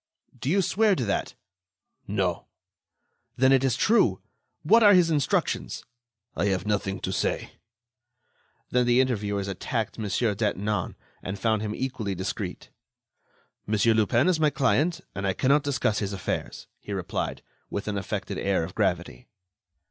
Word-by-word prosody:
"Do 130 +2 -4
you 195 +4 +3
swear 205 +3 +3
to 125 - -2
that?" 100 - -2 0.7
"No." - - -1 0.9
"Then 130 +1 +4
it 135 -1 +4
is 130 -3 +2
true. 230 +1 +3 0.4
What 230 +1 +5
are 205 -2 +8
his 175 -2 +4
instructions?" 145 -4 0 0.5
"I 85 - 0
have 95 -1 0
nothing 100 -2 -1
to - - -2
say." - - -1 1.2
Then 125 -1 +2
the 120 +1 +4
interviewers 105 -6 0
attacked 110 +4 -3
Mon. 110 - -2
Detinan, 105 -2 -1 0.3
and 95 +3 -5
found 110 +1 +1
him 110 0 -3
equally 125 -7 -3
discreet. 95 +1 -5 1.0
"Monsieur 110 +2 +3
Lupin 115 - +3
is 180 -3 +2
my 155 -1 +4
client, 145 +5 +1
and 100 0 -3
I 95 - +1
cannot 140 +8 +3
discuss 130 -7 0
his 100 -1 -3
affairs," 95 - -4
he 100 - -7
replied, 95 -3 -3 0.3
with 100 - -4
an 105 - -1
affected 95 - -4
air 95 -3 +1
of 85 - -6
gravity. - - -1
110 Hz, 150 wpm, -26 LUFS, 100-135 Hz, 1.2 s, are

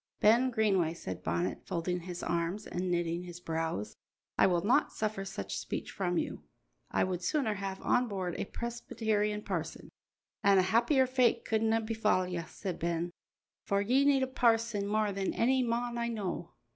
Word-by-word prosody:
"Ben 235 +5 +5
Greenway," 195 -8 +2
said 95 - -6
Bonnet, 85 +3 -1
folding 175 +1 -1
his 175 0 -7
arms 170 +5 -1
and 180 +1 -3
knitting 175 -1 0
his 175 -1 -8
brows, 160 - -3 0.4
"I - - +5
will 175 0 +1
not 235 - +3
suffer 215 -2 -2
such 195 - -4
speech - - -4
from 180 -3 -1
you. - - -2 0.5
I - - +2
would 185 -1 -2
sooner 220 - +1
have 195 -1 -4
on 245 0 +3
board 190 -4 -3
a - - -1
Presbyterian 215 -2 -2
parson." - - -4 0.5
"An' 200 -1 +6
a 185 - +5
happier 235 +8 +3
fate 250 -2 +2
couldna 225 0 +2
befall 215 -4 +1
ye," 175 -2 -3
said 185 0 -5
Ben, 170 +1 -1 0.5
"for 200 - +1
ye 250 +7 +3
need 280 -2 +4
a - - 0
parson 230 -4 +2
mair 215 -1 +2
than 195 -1 -2
ony 260 +3 +4
mon 240 0 -1
I 235 - 0
know." 210 -6 -4
200 Hz, 170 wpm, -31 LUFS, 175-230 Hz, 0.5 s, An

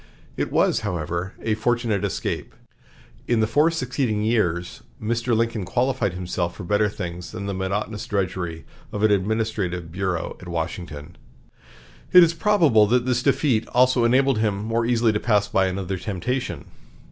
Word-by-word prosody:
It - - -2
was, - - +3
however, 85 -1 -3
a 110 - +1
fortunate 115 -2 0
escape. 100 - -3 0.7
In 120 -2 +2
the 110 - +3
four 145 +9 +3
succeeding 125 -8 -1
years 90 -6 0 0.2
Mr. 115 +1 0
Lincoln 115 -2 0
qualified 125 0 0
himself 90 -1 -3
for - - -8
better 105 +3 +2
things 90 -3 -6
than 100 - -5
the 100 - -3
monotonous 100 +3 -3
drudgery 90 -4 -2 0.3
of 105 - -3
an 110 - +5
administrative 100 -4 -1
bureau 90 -1 -2
at 90 - -10
Washington. 85 -1 -5 1.0
It 180 -1 +10
is 165 0 +3
probable 165 - +4
that 125 +2 +2
this 125 -2 +1
defeat 130 -4 +1
also 125 -1 +4
enabled 130 +1 +3
him 105 -2 0
more 115 +1 0
easily 115 -2 +2
to 105 - 0
pass 105 -3 +2
by 95 -1 +2
another 95 0 -3
temptation. 110 +7 -3
105 Hz, 155 wpm, -23 LUFS, 95-120 Hz, 1.0 s, It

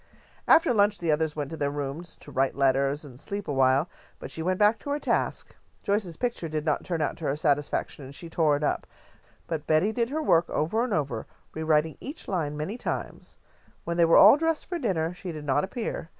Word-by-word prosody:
After 325 - +5
lunch 205 -1 +3
the 170 -2 0
others 155 0 0
went 145 -1 -4
to 160 - -5
their 145 -2 0
rooms 145 +4 -5
to - - -12
write 135 0 +1
letters 140 +2 +1
and 130 -3 -12
sleep 200 +5 -5
awhile, 135 +2 +3 0.3
but - - -9
she 160 - -6
went 185 +3 0
back 210 +2 +4
to 285 - -8
her 285 - 0
task. - - -2 0.3
Joyce's 200 -5 -1
picture 235 -9 -2
did 155 0 -3
not 150 - 0
turn 165 -3 -1
out - - -2
to 160 - -6
her 135 - 0
satisfaction, 145 -1 -1
and 135 +2 -10
she 170 - -8
tore 160 -2 +2
it 150 - -5
up, 145 - -1 0.6
but 155 -3 -4
Betty 160 +7 +3
did 235 +1 -1
her 310 +3 -2
work 170 - +3
over 215 +10 0
and 250 - -3
over, 135 - -2 0.3
rewriting 155 0 +1
each 290 +4 -8
line 155 -6 -2
many 190 +11 -4
times. - - -5 0.5
When 170 0 -3
they 170 - +5
were 165 - +5
all 210 +8 +9
dressed 325 0 0
for 350 -1 -4
dinner, 180 - -1
she 180 0 -7
did 155 -2 -7
not 145 +1 +2
appear. 195 -5 -4
160 Hz, 220 wpm, -27 LUFS, 145-205 Hz, 0.6 s, all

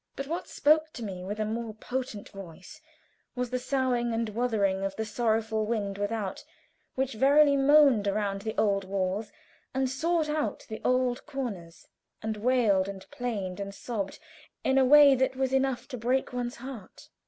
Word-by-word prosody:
But 275 - -4
what 335 +5 -4
spoke 310 +1 +3
to 235 - -7
me 185 -3 -6
with 205 +3 -5
a 215 - 0
more 220 0 -4
potent 245 -2 -5
voice 195 - -11 0.5
was 250 -1 -3
the 255 - 0
soughing 250 -3 0
and 225 -1 -1
wuthering 210 -4 0
of 195 0 -2
the 220 - -3
sorrowful 220 -1 0
wind 200 -3 -2
without, 205 -1 -3 0.5
which 265 0 -1
verily 280 +5 +5
moaned 275 -6 +5
around 200 -1 -1
the 220 +1 -5
old 200 -2 +2
walls, 195 +2 -2 0.4
and 265 0 +1
sought 320 +5 0
out 300 0 -2
the 220 - -6
old 255 -1 +1
corners, 215 - -6 0.4
and 220 -1 -2
wailed, 215 -5 +2
and 195 -1 -7
plained, 205 -7 -4
and 200 0 -5
sobbed 205 -5 -4 0.5
in 265 0 +3
a 265 - +5
way 290 +1 +8
that 260 0 +1
was 265 0 -1
enough 265 -2 0
to 250 -4 -6
break 250 +3 0
one's 245 -1 -3
heart. 245 -5 -10
235 Hz, 170 wpm, -28 LUFS, 205-265 Hz, 0.5 s, way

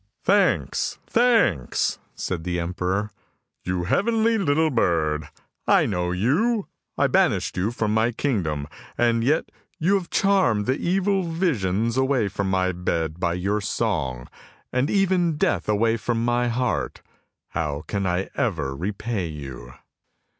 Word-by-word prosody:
" - - -51
Thanks, - - +2
thanks! 225 - +2
" - - -40
said 85 -3 -3
the 90 0 -2
emperor; 90 +4 -2 0.3
" - - -52
you 90 -1 -1
heavenly 225 - +2
little 160 -2 +2
bird, 80 - +1 0.4
I - - +5
know 90 -3 -1
you! 180 - +1 0.3
I - - +3
banished - - +2
you 95 +4 0
from 110 -2 -1
my 110 +2 +2
kingdom, 90 - -1 0.3
and 115 -1 +2
yet 150 +6 +1 0.3
you 180 +5 +2
have 190 -3 0
charmed 130 - +2
the 130 +5 +1
evil 195 +2 +1
visions 115 - 0
away 130 -5 +2
from 100 0 -2
my 95 -1 +1
bed 85 -2 -2
by 85 -2 0
your 100 +4 -1
song, 75 - -2 0.5
and 130 +4 +1
even 180 -5 +2
Death 150 - 0
away 115 +2 +2
from 115 0 -1
my 120 0 +1
heart! 125 +1 -1 0.5
How 75 -2 -2
can 100 -2 -2
I 90 +2 -1
ever 75 - -1
repay 100 - -3
you? 65 -5 -8
105 Hz, 145 wpm, -24 LUFS, 90-140 Hz, 0.5 s, I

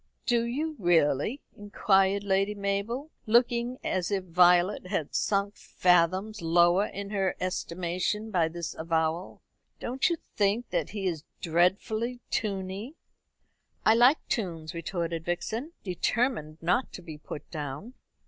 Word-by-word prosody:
"Do 235 -1 +2
you, 305 +7 -2
really?" 175 - +2
inquired 200 -2 +2
Lady 195 +1 +1
Mabel, 205 +9 -2 0.2
looking 240 +2 +2
as 185 -2 -1
if 195 -2 -1
Violet 180 +2 +4
had 180 -6 -2
sunk 200 0 0
fathoms 185 +4 +2
lower 175 +4 +4
in 200 +1 -7
her 195 -3 0
estimation 185 +4 -2
by 170 -5 +3
this 170 0 -5
avowal. 160 +2 -2 0.4
"Don't 260 +7 0
you 340 - +1 0.2
think 210 +4 +1
that - - -1
he 205 -2 -4
is 165 -5 -2 0.2
dreadfully 200 +8 +1
tuney?" 200 +5 -3 0.9
"I 220 - +7
like 245 +6 +4
tunes," 165 -8 -3
retorted 170 -1 -3
Vixen, 220 - -3
determined 180 - -1
not 180 +10 +1
to 180 - -8
be 155 -3 -9
put 150 - -8
down. 150 - -6
190 Hz, 130 wpm, -28 LUFS, 170-220 Hz, 0.9 s, I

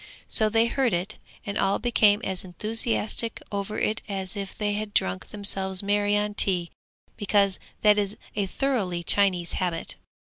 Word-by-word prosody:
So 215 -1 +4
they 225 +1 +3
heard 245 -1 +1
it, 185 +5 -2 0.3
and 200 0 -3
all 195 - +2
became 215 -3 +3
as 190 -1 -3
enthusiastic 225 +4 -1
over 200 +1 -3
it 220 - 0
as 190 -2 -4
if 195 -1 -6
they 205 -1 0
had 210 0 -4
drunk 95 0 0
themselves 195 -2 0
merry 205 0 +2
on 210 0 -1
tea, 180 -4 +2 0.5
because 200 -2 +2 0.2
that 210 -1 +6
is 205 0 -2 0.2
a 200 -2 0
thoroughly 195 -9 -1
Chinese 185 -2 +2
habit. 175 -3 -2
205 Hz, 155 wpm, -26 LUFS, 190-215 Hz, 0.5 s, that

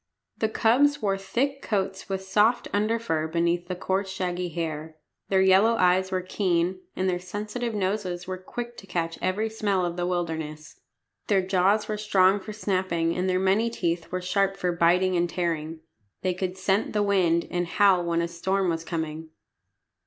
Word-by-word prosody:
The 220 - +1
cubs 265 +7 +3
wore 200 -2 +1
thick 255 +9 -2
coats 195 -1 -2
with 190 0 -2
soft 210 +5 +2
under 215 +3 +1
fur 160 -9 -1
beneath 170 +1 0
the 180 - -3
coarse 190 +2 -1
shaggy 180 -1 -2
hair. 160 -1 -4 0.3
Their 190 -1 +4
yellow 195 +5 +5
eyes 185 -1 +3
were 185 -1 -1
keen, 185 -1 0 0.2
and 185 - 0
their 180 -1 0
sensitive 210 +6 -4
noses 185 -3 -2
were 185 0 -5
quick 240 +5 -7
to 195 - -11
catch 165 -2 -2
every 195 +4 0
smell 205 -4 0
of 175 0 -4
the 175 0 -1
wilderness. 160 -4 -4 0.5
Their 195 -3 +3
jaws 190 +3 +2
were 215 - -2
strong 200 -2 +3
for 205 +3 -8
snapping, 185 -5 -1
and 185 +1 0
their 185 - +2
many 195 +5 +2
teeth 170 -6 -2
were 185 - -2
sharp 195 +1 +1
for 180 - 0
biting 180 +2 +3
and 175 0 +1
tearing. 165 -3 -2 0.4
They 185 -1 +1
could 185 0 -3
scent 190 +2 0
the 210 -1 +2
wind 180 -4 +2
and 175 0 -1
howl 190 -1 +4
when 170 0 0
a - - -1
storm 190 +2 -1
was 165 0 -3
coming. 160 -1 -4
185 Hz, 180 wpm, -26 LUFS, 175-200 Hz, 0.5 s, yellow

